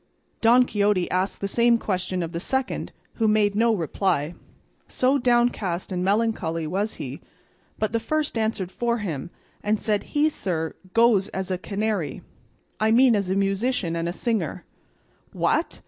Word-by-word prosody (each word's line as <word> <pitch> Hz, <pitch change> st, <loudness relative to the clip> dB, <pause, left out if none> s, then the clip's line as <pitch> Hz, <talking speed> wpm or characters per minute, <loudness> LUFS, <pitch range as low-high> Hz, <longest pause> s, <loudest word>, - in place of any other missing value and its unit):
Don 245 Hz, +2 st, +6 dB
Quixote 205 Hz, -5 st, +1 dB
asked 185 Hz, +2 st, -1 dB
the 200 Hz, -, 0 dB
same 235 Hz, +3 st, +4 dB
question 185 Hz, -4 st, -2 dB
of 165 Hz, -, -5 dB
the 170 Hz, -, -3 dB
second, 265 Hz, +8 st, -2 dB, 0.3 s
who 225 Hz, -, +2 dB
made 210 Hz, -1 st, +3 dB
no 230 Hz, +3 st, +3 dB
reply, 170 Hz, -4 st, 0 dB, 0.5 s
so 265 Hz, +2 st, +2 dB
downcast 240 Hz, -8 st, +1 dB
and 180 Hz, -1 st, -1 dB
melancholy 195 Hz, -5 st, 0 dB
was 200 Hz, +7 st, -2 dB
he; 135 Hz, +1 st, -7 dB, 0.6 s
but 215 Hz, 0 st, -1 dB
the 230 Hz, -, +2 dB
first 310 Hz, +3 st, -1 dB
answered 220 Hz, -5 st, -1 dB
for 235 Hz, +2 st, 0 dB
him, 170 Hz, -, -4 dB, 0.3 s
and 210 Hz, +1 st, 0 dB
said, 210 Hz, -2 st, -1 dB
"He, 300 Hz, +1 st, +5 dB
sir, 165 Hz, -, -3 dB, 0.2 s
goes 225 Hz, -4 st, +4 dB
as 190 Hz, 0 st, -4 dB
a 185 Hz, -, 0 dB
canary, 200 Hz, -7 st, -2 dB, 0.6 s
I 220 Hz, -, +2 dB
mean 240 Hz, +1 st, +5 dB
as 200 Hz, -3 st, -1 dB
a 190 Hz, -, +1 dB
musician 195 Hz, -2 st, 0 dB
and 170 Hz, 0 st, -1 dB
a -, -, -1 dB
singer." 210 Hz, -, -2 dB, 0.7 s
"What!" -, -, 0 dB
205 Hz, 160 wpm, -24 LUFS, 185-230 Hz, 0.7 s, Don